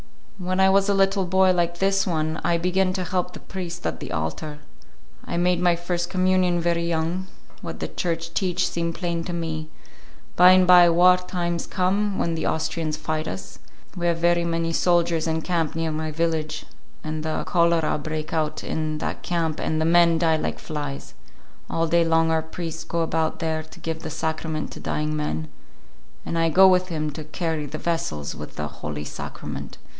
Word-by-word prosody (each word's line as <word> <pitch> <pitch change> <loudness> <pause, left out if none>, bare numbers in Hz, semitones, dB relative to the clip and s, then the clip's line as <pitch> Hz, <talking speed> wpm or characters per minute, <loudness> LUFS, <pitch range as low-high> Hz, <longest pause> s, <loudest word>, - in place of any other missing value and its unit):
When 185 +1 -1
I 190 0 +6
was 195 +1 +3
a 200 - +3
little 195 0 +2
boy 190 +1 +4
like 175 -1 0
this 195 +1 +2
one, 160 -2 -1
I 170 -1 +2
begin 185 +2 +1
to 185 -1 -2
help 180 0 -2
the - - -8
priest 175 -2 -6
at - - -2
the - - -7
altar. 80 - -3 0.7
I - - -4
make 180 0 +2
my 175 -1 +3
first 175 0 -2
communion 185 -1 +2
very 170 0 +1
young; 170 +3 -1 0.3
what - - -6
the - - -2
Church 165 -1 -3
teach 180 -1 +1
seem 170 0 -2
plain 170 -1 -3
to 175 - -4
me. 160 -2 -3 0.7
By 180 +1 +8
'n' 185 0 +5
by 180 -1 +8
war 180 +2 +6
times 175 -2 -3
come, 195 +2 0
when 170 - 0
the 160 - -2
Austrians 160 -1 -1
fight 155 0 -2
us. 95 0 -7 0.4
We 175 -1 -1
have 170 -1 +2
very 170 0 +3
many 165 0 -1
soldiers 170 -2 +2
in 160 0 -1
camp 165 -4 -1
near 165 -1 -1
my 155 0 -2
village, 155 -1 -1 0.4
and 155 0 -3
the 155 0 -2
cholera 170 -3 +2
break 155 +1 -4
out 155 -2 -1
in 155 -1 -2
that - - -4
camp, 165 -3 -1
and 155 - -1
the 160 - +1
men 170 0 +5
die 160 -1 +3
like - - -2
flies. 145 -3 -6 0.6
All 165 - +1
day 170 +1 +3
long 165 0 +3
our 160 0 +2
priest 165 0 -6
go 170 - -1
about 160 -1 0
there 160 -1 -1
to 155 - -14
give 160 0 -4
the 160 - -5
Sacrament 160 0 -3
to - - -8
dying 150 0 -2
men, 80 - -2 0.8
and - - -3
I 165 0 +3
go 190 +4 +7
with 185 0 +4
him 155 -3 -2
to 155 +2 -7
carry 160 -1 -2
the 155 - -5
vessels 155 - -2
with - - -9
the 75 - -3
Holy 75 0 -6
Sacrament. - - -7
165 Hz, 190 wpm, -24 LUFS, 155-180 Hz, 0.8 s, By